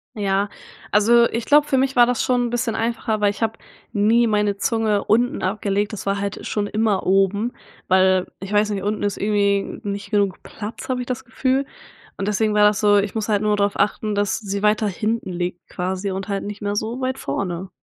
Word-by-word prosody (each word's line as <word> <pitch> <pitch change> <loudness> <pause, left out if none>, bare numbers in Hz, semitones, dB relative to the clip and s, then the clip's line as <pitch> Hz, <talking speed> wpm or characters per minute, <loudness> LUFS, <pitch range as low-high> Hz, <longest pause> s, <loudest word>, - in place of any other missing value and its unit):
Ja, 200 -1 0 0.4
also 235 +3 +5
ich 230 0 -3
glaube 295 +2 +5
für 270 - +2
mich 265 0 +1
war 240 -1 +7
das 245 -1 0
schon 245 -1 +1
'n - - -4
bisschen 240 -1 -1
einfacher, 225 -1 -1
weil 205 - +4
ich 210 - -11
habe 225 0 0 0.4
nie 225 +3 +3
meine 210 -2 +1
Zunge 215 -1 0
unten 240 +3 +2
abgelegt, 205 +2 -1
das 200 - -6
war 200 0 0
halt 200 0 -4
schon 205 -1 -1
immer 215 -2 0
oben, 195 +5 +2 0.3
weil 185 0 +3
ich 195 - -7
weiß 210 0 +2
nicht, 195 -2 -3
unten 210 +1 -2
ist 205 -1 0
irgendwie 200 -1 0
nicht 200 +1 -5
genug 200 -3 0
Platz, 215 +4 -8
habe 255 -1 0
ich 250 - -3
das 260 +1 -3
Gefühl 260 +3 0 0.5
und 195 - -3
deswegen 210 +1 +1
war 210 0 +4
das 210 +1 +1
so 205 -1 +5
ich 200 +1 0
muss 220 0 -2
halt 205 -1 +2
nur 210 -1 +2
darauf 200 0 0
achten, 210 0 0
dass 205 0 0
sie 200 -2 -4
weiter 210 0 +2
hinten 215 0 -2
liegt 175 0 -4
quasi 190 +2 -3
und 190 +1 -4
halt 200 -1 -2
nicht 205 0 -7
mehr 205 0 -2
so 225 +4 -2
weit 260 0 -2
vorne. 180 +5 -4
210 Hz, 215 wpm, -21 LUFS, 200-225 Hz, 0.5 s, war